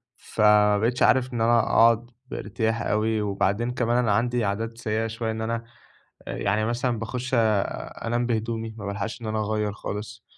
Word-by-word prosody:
فما 105 Hz, -2 st, +3 dB
بقيتش 115 Hz, +4 st, +1 dB
عارف 130 Hz, -1 st, +3 dB
إن 115 Hz, -, -2 dB
أنا 115 Hz, +1 st, +4 dB
أقعُد 115 Hz, +1 st, +3 dB, 0.2 s
بارتياح 115 Hz, -1 st, -2 dB
أوي 110 Hz, +1 st, 0 dB
وبعدين 100 Hz, +3 st, 0 dB
كمان 120 Hz, -1 st, 0 dB
أنا 120 Hz, -4 st, +2 dB
عندي 120 Hz, +2 st, +1 dB
عادات 115 Hz, +3 st, -2 dB
سيئة 110 Hz, -1 st, -1 dB
شوية، 115 Hz, 0 st, -3 dB
إن 110 Hz, 0 st, -4 dB
أنا 115 Hz, +1 st, -2 dB, 0.6 s
يعني 105 Hz, +2 st, 0 dB
مثلًا 120 Hz, 0 st, -1 dB
باخُش 125 Hz, +3 st, -4 dB
أنام 115 Hz, +1 st, 0 dB
بهدومي، 115 Hz, -1 st, -2 dB
ما 105 Hz, -, -7 dB
بالحَقش 100 Hz, +4 st, -4 dB
إن -, -, -7 dB
أنا 110 Hz, 0 st, -1 dB
أغيّر 105 Hz, -1 st, -1 dB
خالص، 105 Hz, +1 st, -6 dB
115 Hz, 160 wpm, -25 LUFS, 105-120 Hz, 0.6 s, أنا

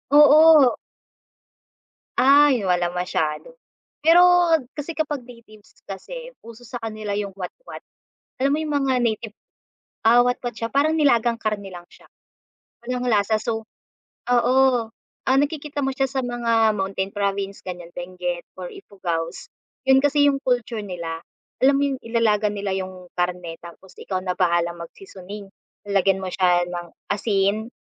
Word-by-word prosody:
oo. 300 Hz, -2 st, +7 dB, 1.4 s
Ay 275 Hz, -2 st, +5 dB
walang 175 Hz, -2 st, 0 dB
masyado. 180 Hz, -, -3 dB, 0.5 s
Pero 335 Hz, +2 st, +7 dB, 0.6 s
kasi 295 Hz, +3 st, -5 dB
kapag 295 Hz, -5 st, -3 dB
natives 225 Hz, -4 st, -17 dB
kasi -, -, -7 dB, 0.2 s
uso 230 Hz, +1 st, -12 dB
sa 245 Hz, +1 st, -7 dB
kanila 215 Hz, -3 st, -4 dB
yung 200 Hz, -1 st, -4 dB
watwat. 195 Hz, -, -9 dB, 0.6 s
Alam 275 Hz, +1 st, +2 dB
mo -, -, -2 dB
yung 305 Hz, -1 st, -3 dB
mga 265 Hz, -, +2 dB
native, 220 Hz, -2 st, -2 dB, 0.7 s
ah, 235 Hz, +2 st, +7 dB
watwat 245 Hz, 0 st, -2 dB
siya 230 Hz, -, -3 dB
parang 290 Hz, +3 st, +3 dB
nilagang 240 Hz, -6 st, +3 dB
karne 210 Hz, -2 st, -3 dB
lang 175 Hz, -1 st, -10 dB
siya. -, -, -19 dB, 0.8 s
Walang 250 Hz, 0 st, -2 dB
lasa 215 Hz, 0 st, +2 dB
so, 225 Hz, -1 st, -3 dB, 0.6 s
oo, 245 Hz, +1 st, +3 dB, 0.7 s
ah, 260 Hz, 0 st, +4 dB
nakikita 290 Hz, 0 st, -2 dB
mo -, -, 0 dB
siya 270 Hz, -1 st, +1 dB
sa 265 Hz, 0 st, -2 dB
mga 230 Hz, -3 st, +1 dB
mountain 195 Hz, 0 st, -2 dB
province 200 Hz, -1 st, -2 dB
gan'yan 175 Hz, -2 st, -7 dB
Benguet 175 Hz, -1 st, -5 dB
or 180 Hz, -1 st, -6 dB
Ifugao's. 170 Hz, -4 st, -5 dB, 0.4 s
'Yon 265 Hz, 0 st, +6 dB
kasi 290 Hz, 0 st, +3 dB
yung 275 Hz, -, 0 dB
culture 245 Hz, -3 st, -1 dB
nila, 170 Hz, -3 st, -5 dB, 0.4 s
alam 275 Hz, +1 st, +5 dB
mo 280 Hz, -, +1 dB
yung -, -, -12 dB
ilalaga 220 Hz, -2 st, +1 dB
nila 200 Hz, -1 st, -3 dB
yung 185 Hz, -1 st, -7 dB
karne 175 Hz, -2 st, -2 dB
tapos 175 Hz, +2 st, -14 dB
ikaw 185 Hz, -2 st, -3 dB
na 185 Hz, -1 st, -2 dB
bahalang 170 Hz, -1 st, +1 dB
mag-seasoning. 195 Hz, -, -10 dB, 0.4 s
Lalagyan 195 Hz, -1 st, +2 dB
mo 185 Hz, -, -3 dB
siya 180 Hz, -2 st, +3 dB
ng 175 Hz, -1 st, -6 dB, 0.3 s
asin 205 Hz, +1 st, 0 dB
215 Hz, 140 wpm, -22 LUFS, 185-260 Hz, 1.4 s, oo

